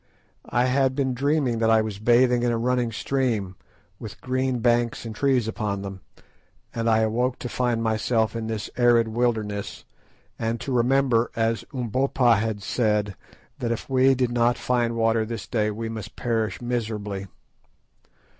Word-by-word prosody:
I 120 Hz, +1 st, +2 dB
had 130 Hz, 0 st, +2 dB
been 130 Hz, -2 st, 0 dB
dreaming 135 Hz, -2 st, 0 dB
that 115 Hz, 0 st, +2 dB
I 110 Hz, -1 st, +4 dB
was 105 Hz, -2 st, -5 dB
bathing 120 Hz, +2 st, +4 dB
in 120 Hz, 0 st, +1 dB
a 115 Hz, -, 0 dB
running 120 Hz, 0 st, 0 dB
stream, 115 Hz, -6 st, -1 dB, 0.4 s
with -, -, -9 dB
green 130 Hz, 0 st, -1 dB
banks 120 Hz, 0 st, +1 dB
and 115 Hz, -, -5 dB
trees 130 Hz, -2 st, +1 dB
upon 105 Hz, -3 st, -3 dB
them, 95 Hz, -1 st, -7 dB, 0.7 s
and 115 Hz, 0 st, -1 dB
I 110 Hz, 0 st, +4 dB
awoke 120 Hz, +3 st, 0 dB
to -, -, -5 dB
find 120 Hz, -2 st, -1 dB
myself 110 Hz, 0 st, 0 dB
in 115 Hz, -1 st, -3 dB
this 110 Hz, -2 st, -3 dB
arid 120 Hz, -2 st, +4 dB
wilderness, 110 Hz, -3 st, -2 dB, 0.5 s
and 115 Hz, +1 st, -1 dB
to 135 Hz, -, -5 dB
remember, 125 Hz, -1 st, +2 dB
as 115 Hz, 0 st, 0 dB
Umbopa 125 Hz, -1 st, +2 dB
had 105 Hz, -1 st, -2 dB
said, 105 Hz, -3 st, 0 dB, 0.4 s
that 115 Hz, -, -2 dB
if 115 Hz, -, -3 dB
we 130 Hz, +1 st, +4 dB
did 125 Hz, -1 st, 0 dB
not 120 Hz, 0 st, +2 dB
find 120 Hz, -2 st, 0 dB
water 115 Hz, 0 st, +2 dB
this 110 Hz, -2 st, -5 dB
day 105 Hz, -3 st, 0 dB
we 110 Hz, +2 st, -4 dB
must 110 Hz, -2 st, -7 dB
perish 115 Hz, -2 st, -1 dB
miserably. 105 Hz, -5 st, -3 dB
115 Hz, 160 wpm, -24 LUFS, 110-125 Hz, 0.7 s, I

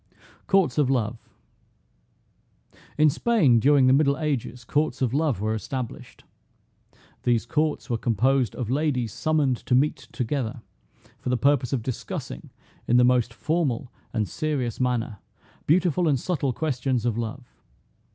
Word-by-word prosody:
COURTS 190 Hz, -9 st, +2 dB
OF 140 Hz, -3 st, +3 dB
LOVE. 120 Hz, -3 st, -2 dB, 1.7 s
In 155 Hz, +1 st, +5 dB
Spain, 155 Hz, -, +3 dB
during 140 Hz, +2 st, +4 dB
the 130 Hz, -, +5 dB
Middle 140 Hz, 0 st, +3 dB
Ages, 140 Hz, -5 st, -3 dB
courts 150 Hz, +7 st, 0 dB
of 130 Hz, -3 st, 0 dB
Love 145 Hz, -6 st, +1 dB
were 110 Hz, +2 st, -1 dB
established. 120 Hz, +2 st, -6 dB, 1.0 s
These 120 Hz, -2 st, +1 dB
courts 150 Hz, +4 st, -1 dB
were 120 Hz, -4 st, -1 dB
composed 120 Hz, +1 st, +1 dB
of 120 Hz, -2 st, -3 dB
ladies 130 Hz, -6 st, 0 dB
summoned 150 Hz, -5 st, +1 dB
to 125 Hz, -, 0 dB
meet 145 Hz, +4 st, +1 dB
together, 125 Hz, -2 st, -3 dB, 0.6 s
for -, -, -4 dB
the 125 Hz, -, +1 dB
purpose 140 Hz, -1 st, +2 dB
of 130 Hz, -5 st, -1 dB
discussing, 115 Hz, -, -6 dB, 0.4 s
in 120 Hz, -, +4 dB
the 125 Hz, -, +6 dB
most 125 Hz, -1 st, +3 dB
formal 135 Hz, -3 st, -1 dB, 0.2 s
and 110 Hz, -3 st, -1 dB
serious 145 Hz, -8 st, -2 dB
manner, 120 Hz, -4 st, -1 dB, 0.5 s
"beautiful 175 Hz, +1 st, +3 dB
and 140 Hz, -4 st, +2 dB
subtle 145 Hz, -4 st, -1 dB
questions 130 Hz, -3 st, -1 dB
of 120 Hz, -3 st, +1 dB
love." 120 Hz, +3 st, -4 dB
130 Hz, 140 wpm, -25 LUFS, 120-150 Hz, 1.7 s, the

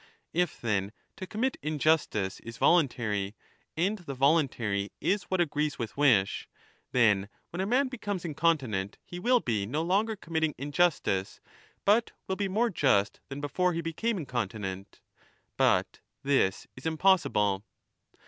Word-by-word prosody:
If, 175 Hz, -1 st, 0 dB
then, 100 Hz, -3 st, -1 dB, 0.2 s
to 185 Hz, -, -6 dB
commit 240 Hz, +8 st, -1 dB
injustice 150 Hz, -10 st, +1 dB
is 115 Hz, 0 st, -9 dB
voluntary, 115 Hz, -, +2 dB, 0.4 s
and 200 Hz, +6 st, +1 dB
the 140 Hz, -6 st, -7 dB
voluntary 125 Hz, -8 st, +1 dB
is 200 Hz, +1 st, 0 dB
what 185 Hz, -, 0 dB
agrees 150 Hz, -3 st, 0 dB
with 115 Hz, -3 st, -5 dB
wish, 120 Hz, -10 st, +3 dB, 0.4 s
then 105 Hz, -5 st, +3 dB, 0.2 s
when 175 Hz, -, -3 dB
a 190 Hz, -, -1 dB
man 260 Hz, +5 st, +3 dB
becomes 205 Hz, -8 st, -4 dB
incontinent 135 Hz, -, 0 dB
he 175 Hz, -, -7 dB
will 245 Hz, +4 st, +3 dB
be 105 Hz, -4 st, -1 dB
no 145 Hz, +8 st, -1 dB
35 165 Hz, -, -3 dB
longer 215 Hz, +4 st, +2 dB
committing 160 Hz, -5 st, -1 dB
injustice, 145 Hz, -, 0 dB, 0.5 s
but 220 Hz, +4 st, +3 dB
will 190 Hz, -, -1 dB
be 200 Hz, 0 st, -1 dB
more 225 Hz, +5 st, +1 dB
just 105 Hz, -, +2 dB
than 140 Hz, +1 st, -6 dB
before 180 Hz, +5 st, +1 dB
he 165 Hz, -, -2 dB
became 195 Hz, +8 st, -1 dB
incontinent. 105 Hz, -, -4 dB, 0.5 s
But -, -, +2 dB, 0.2 s
this 135 Hz, -9 st, +2 dB
is 130 Hz, +5 st, -6 dB
impossible. 145 Hz, -, +2 dB
150 Hz, 140 wpm, -29 LUFS, 110-180 Hz, 0.5 s, wish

